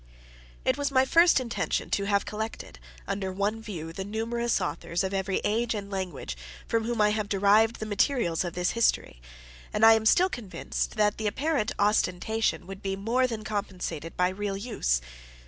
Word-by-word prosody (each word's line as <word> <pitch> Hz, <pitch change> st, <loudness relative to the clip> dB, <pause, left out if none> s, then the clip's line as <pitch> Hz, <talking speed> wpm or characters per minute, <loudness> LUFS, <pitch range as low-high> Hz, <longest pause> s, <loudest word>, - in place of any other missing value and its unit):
It 260 Hz, +2 st, +2 dB
was 285 Hz, -, +1 dB
my 265 Hz, -1 st, +4 dB
first 335 Hz, +2 st, +5 dB
intention 240 Hz, -2 st, -2 dB
to 200 Hz, -, +1 dB
have 200 Hz, 0 st, +1 dB
collected, 215 Hz, -, -6 dB, 0.3 s
under 190 Hz, -1 st, -2 dB
one 205 Hz, +4 st, -1 dB
view, 165 Hz, -7 st, -6 dB
the 190 Hz, -, -4 dB
numerous 230 Hz, +3 st, -1 dB
authors, 175 Hz, -1 st, -2 dB
of 190 Hz, 0 st, -2 dB
every 190 Hz, 0 st, 0 dB
age 225 Hz, +2 st, 0 dB
and 200 Hz, -1 st, -6 dB
language, 180 Hz, -, -4 dB, 0.3 s
from 225 Hz, -1 st, 0 dB
whom 235 Hz, -1 st, -2 dB
I 210 Hz, 0 st, +5 dB
have 210 Hz, -1 st, -2 dB
derived 210 Hz, +3 st, +4 dB
the 215 Hz, -, -5 dB
materials 205 Hz, -, +1 dB
of 175 Hz, -2 st, -4 dB
this 180 Hz, 0 st, 0 dB
history; 225 Hz, -, 0 dB, 0.5 s
and 215 Hz, -, +3 dB
I 225 Hz, -, +9 dB
am 220 Hz, 0 st, +2 dB
still 360 Hz, +10 st, +5 dB
convinced 235 Hz, -, -4 dB
that 210 Hz, -1 st, +2 dB
the 215 Hz, -, -1 dB
apparent 280 Hz, 0 st, 0 dB
ostentation 210 Hz, 0 st, +1 dB
would 195 Hz, +1 st, -9 dB
be 195 Hz, -1 st, -2 dB
more 235 Hz, +6 st, +1 dB
than 225 Hz, -3 st, -5 dB
compensated 180 Hz, -6 st, -4 dB
by 180 Hz, 0 st, +3 dB
real 195 Hz, +1 st, -3 dB
use. 130 Hz, -, 0 dB
210 Hz, 180 wpm, -27 LUFS, 190-225 Hz, 0.5 s, I